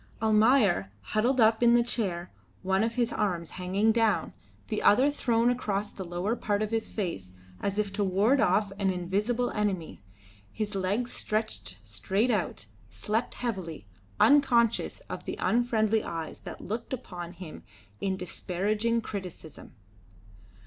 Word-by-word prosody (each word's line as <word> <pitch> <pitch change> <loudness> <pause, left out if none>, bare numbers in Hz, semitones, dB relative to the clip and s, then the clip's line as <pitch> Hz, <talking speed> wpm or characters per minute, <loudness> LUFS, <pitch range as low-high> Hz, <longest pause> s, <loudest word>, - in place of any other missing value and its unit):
Almayer, 215 - +4
huddled 235 - +1
up 220 0 +5
in 235 0 +6
the 240 - +5
chair, 185 -7 -2 0.3
one 190 +2 +2
of 230 +1 -1
his 240 -1 +1
arms 175 -6 -1
hanging 190 +4 +1
down, 225 -1 +1 0.3
the 215 - -2
other 260 +8 +5
thrown 240 -4 +2
across 210 -4 -2
the 190 - -7
lower 175 +5 -2
part 210 -2 0
of 215 - -3
his 225 -1 -1
face 130 - -4 0.3
as 200 0 -2
if 205 -2 -1
to 205 - 0
ward 200 +8 +3
off 205 0 +2
an 195 -1 +2
invisible 205 +7 0
enemy, 195 - -2 0.5
his 215 -1 -3
legs 200 +6 -1
stretched 215 - -3
straight 190 - 0
out, 175 - -1 0.2
slept 220 +3 -2
heavily, 185 - -4 0.3
unconscious 240 -6 +4
of - - -8
the - - -4
unfriendly 225 -2 +2
eyes 165 -2 -5
that - - -9
looked 225 +6 -4
upon 180 -8 -6
him 170 -3 -9 0.4
in 190 -1 -1
disparaging 210 +5 -1
criticism. 180 -10 -8
210 Hz, 140 wpm, -28 LUFS, 185-230 Hz, 0.5 s, in